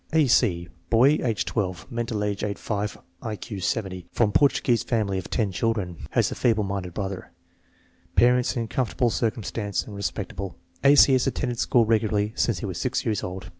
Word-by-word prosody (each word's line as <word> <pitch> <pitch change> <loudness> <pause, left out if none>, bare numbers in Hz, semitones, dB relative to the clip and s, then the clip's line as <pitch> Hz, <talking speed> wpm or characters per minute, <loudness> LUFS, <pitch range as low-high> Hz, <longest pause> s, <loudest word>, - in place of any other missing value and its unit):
A. 160 -2 +5
C. 95 -9 +2 0.2
Boy, 130 +7 +5
age 115 -4 0
12; 95 +1 -3
mental 115 -3 -2
age 105 -1 -2
8 100 -1 -2
5; 105 -1 -3 0.2
I 110 -3 -4
Q 105 -1 -7
70. 95 -3 -2
From 110 -3 +2
Portuguese 125 -1 +3
family 105 -5 0
of 90 - -8
ten 105 -4 0
children. 95 -4 -2
Has - - +1
a - - -1
feeble 110 -3 +2
minded 95 -3 -4
brother. 95 -2 -4 0.9
Parents 125 +1 +3
in 115 -1 -1
comfortable 125 0 0
circumstances 110 -3 -2
and 105 - -9
respectable. 100 -1 -4 0.3
A. 140 +1 +7
C. 140 - +7
has 130 0 +2
attended 125 -2 -2
school 120 -2 +3
regularly 110 -1 +1
since 115 -6 +1
he - - -3
was 95 -4 -4
6 130 0 -1
years 110 -4 0
old. 95 +1 -6
110 Hz, 180 wpm, -25 LUFS, 100-120 Hz, 0.9 s, A